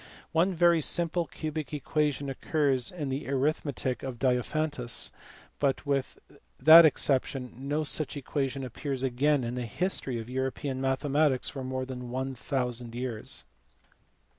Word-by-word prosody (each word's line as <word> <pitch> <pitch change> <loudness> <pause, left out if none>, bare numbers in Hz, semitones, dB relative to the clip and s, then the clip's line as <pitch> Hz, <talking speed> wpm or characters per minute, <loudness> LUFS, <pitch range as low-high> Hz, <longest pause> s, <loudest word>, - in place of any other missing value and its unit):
One 175 +3 +2
very 170 -1 +4
simple 170 +2 0
cubic 155 -1 -5
equation 150 -1 -1
occurs 135 -2 0
in 150 -6 -4
the 135 +2 -3
Arithmetic 140 -2 -1
of 130 -3 -5
Diophantus, 130 +1 0 0.5
but 140 0 0
with 140 -2 -1 0.4
that 160 +4 +10
exception 135 -2 0
no 140 +5 -2
such 150 -1 +1
equation 135 -1 -2
appears 130 +2 -4
again 135 +2 +2
in 120 0 -3
the 125 -1 -3
history 135 - -1
of 115 - -7
European 130 +1 -3
mathematics 135 +1 +1
for 135 -2 -6
more 130 0 -3
than 125 -2 -7
a 130 +1 -2
thousand 125 -2 -3
years. 120 -3 -2
135 Hz, 135 wpm, -29 LUFS, 130-150 Hz, 0.5 s, that